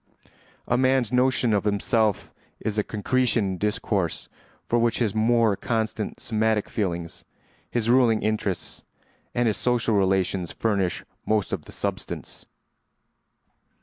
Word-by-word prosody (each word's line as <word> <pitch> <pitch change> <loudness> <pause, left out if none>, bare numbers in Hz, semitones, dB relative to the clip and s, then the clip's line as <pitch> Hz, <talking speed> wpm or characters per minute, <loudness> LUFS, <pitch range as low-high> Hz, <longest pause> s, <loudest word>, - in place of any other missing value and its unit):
A 120 - +2
man's 130 -3 +2
notion 125 -2 +3
of 100 - +2
himself 105 0 +1 0.3
is 105 -1 -1
a - - +2
concretion 115 +1 +1
in 95 -1 -2
discourse 105 -4 -1 0.4
for 120 - +2
which 115 -1 +2
his 110 -5 0
more 115 -1 +3
constant 110 -1 -2
somatic 110 -1 0
feelings, 85 -5 -3 0.5
his 115 -2 -1
ruling 120 -3 +4
interests, 105 -3 -2 0.5
and 120 - +2
his 110 -4 +1
social 120 +2 +1
relations 95 -2 +1
furnish 100 -5 -1 0.2
most 105 -2 0
of 85 -6 -3
the - - -12
substance. - - -5
110 Hz, 125 wpm, -25 LUFS, 100-120 Hz, 0.5 s, ruling